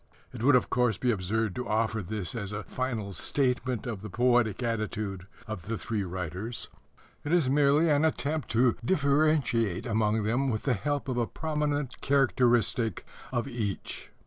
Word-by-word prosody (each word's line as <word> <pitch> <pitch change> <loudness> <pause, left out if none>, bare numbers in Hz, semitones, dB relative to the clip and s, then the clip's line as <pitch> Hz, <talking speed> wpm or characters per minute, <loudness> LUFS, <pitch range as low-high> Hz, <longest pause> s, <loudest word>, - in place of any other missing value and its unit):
It - - -7
would, 135 +3 +5
of 125 - +2
course, 125 -4 +2
be 125 - +1
absurd 105 +1 -1
to 125 - -4
offer 110 0 +1
this 95 -2 -4
as 100 -4 -4
a 105 0 -4
final 115 -6 -3
statement 125 -1 0
of 110 -6 -4
the 105 - -7
poetic 120 0 +2
attitude 105 -4 -3 0.2
of 105 -5 -6
the 115 0 -2
three 110 -2 -2
writers. 95 +5 -5 0.5
It 145 - -3
is 165 -7 +3
merely 145 +3 +4
an 150 -1 +3
attempt 155 -2 0
to 120 +1 +4
differentiate 140 - +2
among 110 -1 +1
them 120 +6 +1
with 110 -3 -2
the 135 - +2
help 145 +7 -2
of 130 -2 -2
a 120 -2 +1
prominent 150 -3 -2
characteristic 120 -5 +2 0.3
of 120 0 -1
each. 110 -7 -4
120 Hz, 165 wpm, -29 LUFS, 105-135 Hz, 0.5 s, would